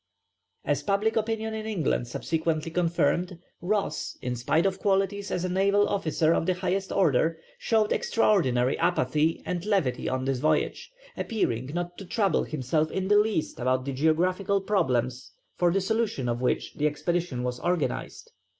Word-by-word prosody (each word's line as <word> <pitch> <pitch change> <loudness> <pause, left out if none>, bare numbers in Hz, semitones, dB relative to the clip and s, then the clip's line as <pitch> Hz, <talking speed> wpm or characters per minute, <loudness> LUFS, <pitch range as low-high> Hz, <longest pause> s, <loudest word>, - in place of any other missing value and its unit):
As 145 -1 +1
public 200 +7 +1
opinion 220 0 -1
in 220 0 -4
England 165 - -1
subsequently 160 +4 -2
confirmed, 175 +1 0 0.2
Ross, 200 +3 -2
in 125 0 -3
spite 155 +8 +1
of 195 -1 0
qualities 200 0 0
as 180 - -1
a - - 0
naval 200 +3 +2
officer 165 -4 +1
of 165 - 0
the 185 - +2
highest 190 +1 -2
order, 160 -2 +2 0.2
showed 220 -2 +1
extraordinary 135 - +2
apathy 155 +5 +1
and 175 -1 -3
levity 190 -12 0
on 130 0 -2
this 135 -2 0
voyage, 155 - 0 0.2
appearing 130 - -1
not 175 0 -4
to 195 - -8
trouble 195 -3 +1
himself 155 +2 -1
in 190 +3 -2
the 205 0 +6
least 210 -7 -1
about 130 +1 0
the 140 - -3
geographical 180 +7 +1
problems 130 - -1 0.2
for 175 -1 +2
the 195 - +2
solution 200 - -1
of 120 0 -1
which 125 - -1
the 150 - +1
expedition 150 -3 -2
was 125 0 -3
organized. 175 -4 -2
175 Hz, 160 wpm, -27 LUFS, 140-195 Hz, 0.2 s, the